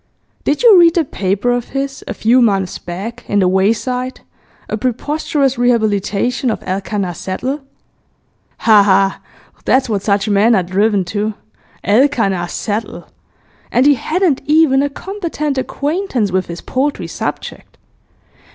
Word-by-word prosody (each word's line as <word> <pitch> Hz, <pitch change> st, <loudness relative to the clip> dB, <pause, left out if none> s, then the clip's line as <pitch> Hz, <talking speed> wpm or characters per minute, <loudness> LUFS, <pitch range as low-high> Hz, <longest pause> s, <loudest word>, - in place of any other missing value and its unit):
Did 290 Hz, +10 st, 0 dB
you 435 Hz, -6 st, +8 dB
read 340 Hz, 0 st, +5 dB
a 335 Hz, -, +4 dB
paper 205 Hz, +1 st, -1 dB
of 245 Hz, -1 st, -1 dB
his, 275 Hz, 0 st, -3 dB
a -, -, -4 dB
few 240 Hz, +4 st, +3 dB
months 195 Hz, -5 st, +1 dB
back, 195 Hz, +7 st, -7 dB
in 205 Hz, -, 0 dB
The 190 Hz, -2 st, +3 dB
Wayside, 230 Hz, +7 st, 0 dB, 0.5 s
a -, -, -2 dB
preposterous 270 Hz, +3 st, -1 dB
rehabilitation 235 Hz, +1 st, +1 dB
of 220 Hz, -, -3 dB
Elkanah 190 Hz, 0 st, -2 dB
Settle? 255 Hz, -, -4 dB, 1.0 s
Ha! 215 Hz, -2 st, +6 dB
Ha! 195 Hz, -1 st, +2 dB, 0.4 s
That's 260 Hz, -1 st, +2 dB
what 205 Hz, -3 st, -1 dB
such 200 Hz, 0 st, 0 dB
men 210 Hz, +3 st, +4 dB
are 190 Hz, -, +2 dB
driven 195 Hz, +2 st, +1 dB
to. 210 Hz, 0 st, -1 dB, 0.5 s
Elkanah 205 Hz, -7 st, +2 dB
Settle! 215 Hz, +1 st, -4 dB, 0.6 s
And 250 Hz, -, +3 dB
he 290 Hz, -, +6 dB
hadn't 315 Hz, +3 st, 0 dB
even 300 Hz, -3 st, +4 dB
a 285 Hz, -, 0 dB
competent 310 Hz, -5 st, -4 dB
acquaintance 280 Hz, -, -2 dB
with 185 Hz, 0 st, 0 dB
his 170 Hz, 0 st, -7 dB
paltry 280 Hz, +3 st, -2 dB
subject. -, -, -6 dB
230 Hz, 135 wpm, -16 LUFS, 200-275 Hz, 1.0 s, you